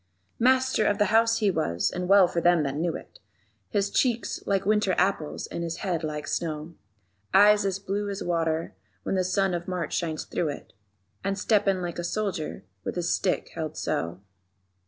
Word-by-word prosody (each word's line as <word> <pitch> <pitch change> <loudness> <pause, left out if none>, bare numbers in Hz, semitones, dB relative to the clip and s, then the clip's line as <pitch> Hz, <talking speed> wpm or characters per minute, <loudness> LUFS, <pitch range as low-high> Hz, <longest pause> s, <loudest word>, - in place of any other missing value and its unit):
Master 260 -1 +3
of 205 -1 +2
the 210 0 +1
House 230 0 +4
he 210 -3 +2
was, 90 - 0
and 180 0 -4
well 195 -2 +7
for 170 -1 -2
them 175 -2 +4
that 140 -1 -2
knew 165 +2 -1
it: - - -11 0.5
His 200 -1 0
cheeks 240 -3 0
like 195 -2 +1
winter 210 -2 +2
apples 180 -5 0
and - - -5
his 165 0 -3
head 170 -3 -1
like 150 -1 -4
snow; 155 0 -3 0.6
Eyes 205 +1 +6
as 190 -1 -1
blue 200 +1 -3
as 200 0 -4
water 165 -2 -1 0.3
when - - -2
the 185 -1 +2
sun 190 +1 +1
of 175 0 -3
March 180 -3 -3
shines 160 -3 -2
through 165 - -1
it. 145 - -8 0.5
_And 195 0 -1
steppin' 200 -3 +2
like 175 0 -4
a - - -2
soldier 180 - -3 0.2
with - - -4
his 175 -1 0
stick 185 - 0
held 160 -1 -5
so. 85 +2 -2
185 Hz, 185 wpm, -26 LUFS, 165-200 Hz, 0.6 s, well